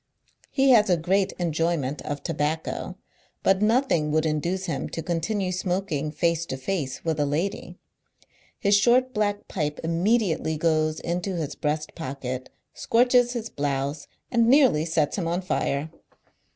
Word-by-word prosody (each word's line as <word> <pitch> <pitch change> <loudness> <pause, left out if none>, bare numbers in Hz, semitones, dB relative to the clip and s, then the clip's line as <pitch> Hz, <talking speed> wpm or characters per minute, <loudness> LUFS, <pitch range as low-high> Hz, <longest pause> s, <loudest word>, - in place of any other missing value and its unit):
He 270 -1 +3
has 215 -4 +5
a 180 - +4
great 190 +4 +1
enjoyment 165 -4 -1
of 145 -1 -5
tobacco, 160 +3 -2 0.5
but 195 0 +3
nothing 215 - +2
would 155 +1 +1
induce 170 +5 -1
him 160 -6 -3
to 165 - -5
continue 180 +4 -1
smoking 180 -5 -2
face 165 +2 0
to 130 - -4
face 135 -1 -3
with 160 -2 0
a 145 - +2
lady. 165 +8 -3 0.8
His 200 - +2
short 245 +5 +3
black 205 -1 -1
pipe 150 -4 -3
immediately 170 -1 +1
goes 155 -1 +1
into 180 +2 -2
his 155 -4 -3
breast 150 +1 -2
pocket, 130 -5 -5 0.3
scoi'ches 245 +1 +3
his 230 -2 -4
blouse, 140 +1 -2 0.2
and 235 -1 +3
nearly 250 - +5
sets 160 +2 0
him 170 - -2
on 175 +3 -1
lire. 145 0 -1
170 Hz, 145 wpm, -25 LUFS, 150-200 Hz, 0.8 s, has